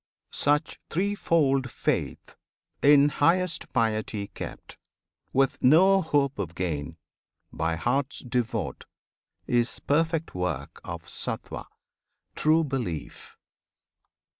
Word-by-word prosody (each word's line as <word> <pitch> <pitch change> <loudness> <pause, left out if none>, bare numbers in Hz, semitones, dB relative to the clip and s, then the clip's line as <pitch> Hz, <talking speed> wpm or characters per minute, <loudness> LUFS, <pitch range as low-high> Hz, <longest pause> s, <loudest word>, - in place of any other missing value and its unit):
Such 145 +1 +1
threefold 160 -8 +1
faith, - - -2 0.5
in 145 0 +6
highest 170 +3 +1
piety 110 -4 -1
Kept, - - -9 0.5
with 135 0 +1
no 190 +8 +6
hope 140 - +1
of 85 -4 -4
gain, 80 -3 -3 0.6
by 80 0 -1
hearts 130 - -1
devote, 120 -5 -2 0.6
Is 120 -1 +1
perfect 165 +2 0
work 90 -6 -3
of - - -6
Sattwan, - - -5 0.7
true 160 +2 +3
belief. 120 - -5
135 Hz, 90 wpm, -27 LUFS, 105-155 Hz, 0.7 s, in